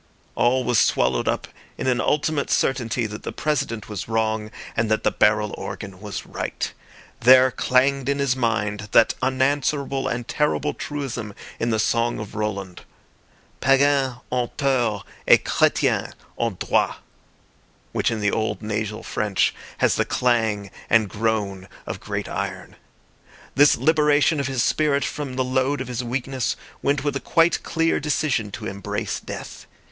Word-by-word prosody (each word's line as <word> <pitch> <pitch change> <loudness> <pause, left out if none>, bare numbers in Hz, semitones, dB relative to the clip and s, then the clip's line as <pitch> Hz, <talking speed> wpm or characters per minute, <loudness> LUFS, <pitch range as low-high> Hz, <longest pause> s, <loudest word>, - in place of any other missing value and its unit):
All 125 +2 +2
was 120 -2 +2
swallowed 60 0 +2
up - - -1 0.3
in - - -4
an 125 -1 +2
ultimate 150 -1 0
certainty 120 -2 +1
that 105 0 -6
the - - -5
President 120 -8 -2
was 105 -4 -5
wrong 110 -1 0 0.3
and 110 -1 +1
that 110 - +1
the - - +3
barrel 105 0 +2
organ 95 -3 -7
was 105 -2 -6
right. - - -4 0.5
There 130 +1 +7
clanged 135 +2 +2
in 140 - +1
his 140 -2 +1
mind 105 -4 -1
that 115 - +6
unanswerable 135 +1 0
and 120 -1 -3
terrible 150 0 0
truism 125 -8 -5 0.2
in 115 - 0
the 110 - +1
song 115 +2 +1
of 105 -1 -7
Roland— 100 -4 -4 0.8
"Païens 135 -1 +3
ont 125 -1 -2
tort 120 -7 +1 0.2
et - - +7
Chrétiens - - +2 0.2
ont 115 -5 -2
droit," - - +1 1.0
which - - +1
in 110 -2 -2
the 100 -1 +2
old 110 -2 -2
nasal 105 0 -3
French 100 -3 0 0.2
has - - +3
the - - +3
clang 110 -5 0 0.2
and 110 -3 +4
groan 100 -3 -1 0.2
of - - -5
great - - -4
iron. - - -5 0.8
This 145 +1 +5
liberation 150 -1 +3
of 140 - -1
his 130 -2 0
spirit 145 -2 +2
from 145 -3 -4
the 130 - +1
load 130 +2 +1
of 130 - -4
his 125 -1 -3
weakness 130 0 -2 0.3
went 140 0 +1
with 145 -2 -1
a - - 0
quite 165 +3 +2
clear 165 0 +1
decision 145 -7 0
to 105 - -6
embrace 100 -2 -3
death. - - -8
120 Hz, 150 wpm, -23 LUFS, 105-140 Hz, 1.0 s, There